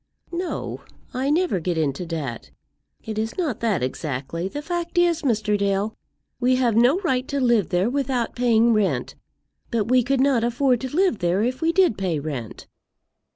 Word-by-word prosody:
"No; 350 +1 -4 0.3
I 260 +2 -1
never 330 - +2
get 175 0 -2
into 155 +2 -1
debt. 145 -8 -5 0.5
It 220 -1 -4
is 225 +1 -3
not 315 - -1
that, 210 - 0
exactly. 140 +5 -3
The 290 +9 -6
fact 345 +1 -4
is, 345 -2 +3
Mr. 220 -6 +1
Dale, 200 +1 0 0.4
we 255 +1 +3
have 245 -4 +2
no 245 +8 +5
right 260 -8 0
to 280 - -2
live 235 -7 +2
there 180 +2 +1
without 255 -2 -1
paying 235 -1 +3
rent; 185 - 0 0.6
but 225 -3 -1
we 255 0 +5
could 265 +2 0
not 265 -4 +3
afford 245 +1 +2
to 260 +2 -5
live 370 - +2
there 180 +3 +1
if 255 +4 -2
we 325 +1 +3
did 360 - +3
pay 180 -5 -1
rent." 140 -7 -6
235 Hz, 175 wpm, -23 LUFS, 190-275 Hz, 0.6 s, no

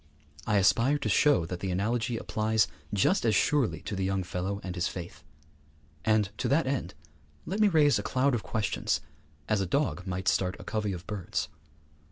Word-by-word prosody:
I 105 -2 +3
aspire 115 +9 +4
to 110 - -3
show 140 - +4
that 85 +1 -5
the 95 - -3
analogy 115 +5 0
applies 110 -1 +1 0.2
just 105 - +2
as 110 -3 +3
surely 140 +2 +2
to 105 - -5
the 95 - -2
young 95 0 0
fellow 90 +3 -3
and 95 - -4
his 90 -1 -1
faith. 85 -4 -8 0.8
And 110 -3 +2
to - - 0
that 150 +3 +2
end 135 -1 -2 0.5
let 195 +5 -3
me 215 - +6
raise 155 -6 +4
a - - -1
cloud 135 +1 +1
of 120 - 0
questions 105 -10 -1 0.5
as 105 -2 +1
a 95 - -1
dog 100 - -1
might 90 0 -3
start 95 0 +2
a - - -8
covey 105 -2 -2
of 90 -1 -7
birds. 100 -5 -3
105 Hz, 190 wpm, -29 LUFS, 95-125 Hz, 0.8 s, me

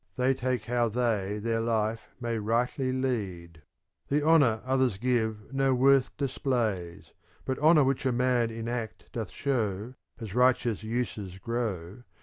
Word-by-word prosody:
They 130 +1 +2
take 125 -3 -2
how 120 0 +1
they 105 -4 0
their 115 +1 -1
life 115 -1 -1
may 120 -2 -2
rightly 120 +4 0
lead. 95 -11 -3 0.5
The 145 +1 +1
honour 140 -9 +4
others 130 -5 +1
give 110 -1 -1
no 135 -1 +2
worth 135 +1 +3
displays; 115 - -2 0.3
But 130 - -2
honour 155 0 +6
which 135 0 0
a - - +2
man 125 -1 +2
in 115 0 -6
act 115 -4 -5
doth - - -4
show, 110 -6 -2
^ - - -31 0.2
As 110 -5 -7
righteous 125 -3 +2
uses 110 -5 -3
grow. 105 -2 -4
120 Hz, 145 wpm, -28 LUFS, 110-130 Hz, 0.5 s, honour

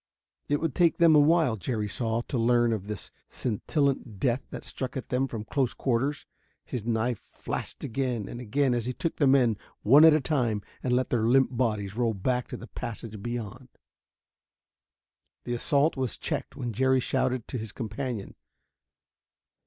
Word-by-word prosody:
It 145 0 +2
would 165 -4 -1
take 170 -3 +3
them 165 -2 +6
a - - +8
while, 150 -5 +4
Jerry 105 +1 -2
saw, 115 +1 -1
to 130 - -3
learn 120 0 +3
of 100 -2 -4
this 105 -2 -6 0.2
scintillant 130 -1 -1
death 125 +3 +1
that - - -8
struck 130 0 -5
at 130 - -6
them 130 +1 +1
from 115 -4 -5
close 130 +3 -1
quarters. 135 +3 0 0.4
His 120 - -4
knife 115 0 0
flashed - - -6
again 125 -4 -2
and 120 - -7
again 130 +3 +1
as 120 -1 -1
he 125 - -1
took 165 +5 -3
the 145 - +3
men 125 -5 +4 0.3
one 140 +8 +7
at 160 -1 +8
a - - +3
time 125 -8 0 0.2
and 125 -1 +1
let 130 +1 +1
their 115 -2 +1
limp 130 +1 +4
bodies 105 -5 -1
roll 115 -3 +1
back 125 +6 -1
to - - -6
the - - -9
passage 115 -4 -7
beyond. 120 +2 -5 1.7
The 120 - -3
assault 140 +5 +2
was 130 -4 -2
checked - - -3
when 120 -2 -4
Jerry 130 +3 +3
shouted 130 -1 0
to 125 - -3
his 110 -1 -6
companion. 115 -1 -4
125 Hz, 175 wpm, -28 LUFS, 115-135 Hz, 1.7 s, a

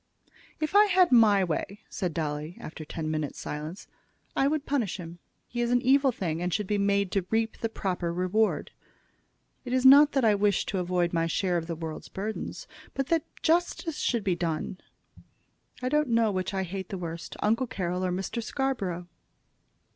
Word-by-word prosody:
"If 310 +4 -2
I 415 +1 +8
had 370 -4 +4
my 215 -5 +6
way," 190 +4 -3
said 180 -4 -3
Dolly, 155 +1 -3
after 155 - -8
ten 155 0 -4
minutes' 155 -2 -3
silence, 155 +5 -6 0.5
"I 270 - +3
would 295 0 -1
punish 245 -11 -1
him. 170 -1 -9 0.3
He 240 - -3
is 240 - +1
an 245 0 +4
evil 270 +1 +4
thing, 170 -7 -3
and 180 0 -1
should 210 +4 0
be 205 +1 0
made 200 -1 +1
to 190 -3 -1
reap 225 0 0
the 225 - -1
proper 180 -5 -2
reward. 185 +5 0 0.9
It 250 -1 -4
is 255 0 +2
not 285 +3 +9
that 270 -3 +2
I 215 - +5
wish 205 -1 +2
to 195 - -2
avoid 180 -1 0
my 165 0 +1
share 180 +2 0
of 165 -1 -1
the 170 - -3
world's 160 -1 -6
burdens, 215 - -5 0.3
but 270 -1 -2
that 330 -2 +2 0.2
justice 335 -1 +1
should 235 -4 0
be 185 -3 +1
done. 170 +2 -3 1.0
I 255 - +1
don't 300 -1 +2
know 230 -2 +3
which 185 0 -2
I 190 -1 -1
hate 190 0 -5
the 195 - -4
worst, 170 -1 -6
Uncle 230 +5 +1
Carroll 180 -4 -2
or 185 - 0
Mr. 195 +6 -3
Scarborough." 210 -9 -2
200 Hz, 185 wpm, -28 LUFS, 175-245 Hz, 1.0 s, not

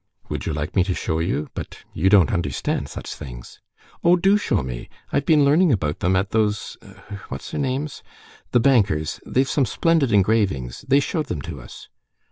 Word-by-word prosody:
"Would - - -4
you - - -1
like 75 0 -4
me 95 - +4
to 95 -2 -1
show 80 - -2
you? 80 -3 -1
But - - -7 0.2
you 95 +4 +2
don't 95 -5 +5
understand 85 -8 -2
such - - -7
things." - - -10 0.4
"Oh, 175 +1 +6
do 195 +3 +3
show 205 - 0
me! 60 -2 -6 0.2
I've 140 - 0
been 150 -3 +5
learning 155 +4 +4
about 80 - -1
them 90 +1 +1
at 95 +2 0
those—what's 105 -2 -4
their - - -2
names?... 140 +2 -3 0.5
the 125 - +3
bankers... 105 - +2
they've 130 +1 +1
some 135 -4 +1
splendid 165 -7 +2
engravings. 95 - +1
They 140 +2 +4
showed 155 0 -2
them 75 - -4
to - - -7
us." - - -12
105 Hz, 180 wpm, -22 LUFS, -, 0.5 s, Oh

